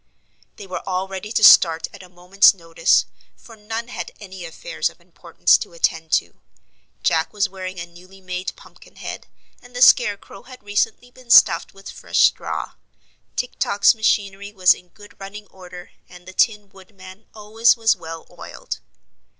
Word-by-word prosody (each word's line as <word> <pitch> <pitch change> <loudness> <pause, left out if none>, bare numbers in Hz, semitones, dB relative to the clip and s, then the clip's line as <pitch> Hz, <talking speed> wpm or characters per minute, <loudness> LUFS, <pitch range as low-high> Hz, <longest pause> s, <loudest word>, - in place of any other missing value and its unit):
They 200 - -11
were 185 - -6
all 185 +1 -2
ready 195 +2 -7
to 220 - 0
start 165 -5 +6
at 200 - -12
a 185 - -15
moment's 180 +3 +3
notice, 165 -2 +1 0.3
for 230 - -16
none 225 +2 -6
had - - -7
any 190 -3 -10
affairs - - -4
of - - -21
importance - - +1
to - - -8
attend 165 - -2
to. - - -1 0.6
Jack 160 -1 +1
was 210 -1 0
wearing 185 -1 -8
a 170 - -5
newly 180 +3 -18
made 185 0 -5
Pumpkin - - -19
head - - -8 0.3
and 245 0 -18
the 245 - -4
Scarecrow 205 -5 +3
had 255 -4 -15
recently 215 +4 -2
been 255 -1 -19
stuffed 235 - +5
with 195 0 -11
fresh - - -1
straw. - - 0 0.6
Tik 250 - -4
Tok's 200 0 +3
machinery 200 -2 -1
was 185 -4 +4
in 180 - -16
good 205 +2 -18
running 200 +2 -9
order 180 -1 -13 0.2
and 180 0 -16
the 185 - -10
Tin 210 -1 0
Woodman 190 +1 -16
always 220 +3 +2
was 225 -1 +2
well 165 -2 -9
oiled. - - -8
195 Hz, 165 wpm, -21 LUFS, 180-215 Hz, 0.6 s, start